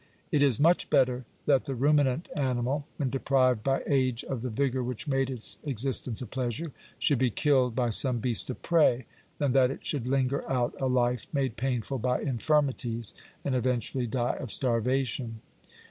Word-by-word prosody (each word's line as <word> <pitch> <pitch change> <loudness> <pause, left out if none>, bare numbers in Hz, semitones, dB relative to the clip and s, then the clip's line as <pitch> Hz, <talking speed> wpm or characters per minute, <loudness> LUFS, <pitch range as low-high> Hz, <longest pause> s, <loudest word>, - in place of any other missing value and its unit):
It 145 - +2
is 135 -6 +4
much 170 +4 +3
better 125 -1 +2 0.2
that 140 -3 +3
the 135 - -3
ruminant 145 +2 +2
animal, 135 +1 -1
when 135 -5 -1
deprived 130 -3 +2
by 135 +1 0
age 130 -4 +1
of 130 -4 -4
the 125 - -3
vigour 130 +2 0
which 125 +2 -5
made 135 -1 +1
its 125 -4 -3
existence 130 -3 -1
a - - -5
pleasure, 130 +6 -3 0.3
should 140 -5 +2
be 130 -1 +3
killed 130 -1 +2
by 120 -2 +1
some 125 +3 +3
beast 115 +1 -2
of 130 - -5
prey, 150 -8 +3 0.3
than 145 -3 +1
that 130 -1 +4
it 135 - -7
should 135 -5 -2
linger 135 +1 0
out 125 -2 0
a 135 - +1
life 125 -2 +1
made 135 -5 -1
painful 130 +1 -2
by 125 +2 0
infirmities, 130 -4 -1 0.3
and 140 - 0
eventually 125 0 -1
die 120 +1 -1
of 125 - -5
starvation. 120 -1 +1
130 Hz, 175 wpm, -28 LUFS, 120-135 Hz, 0.3 s, is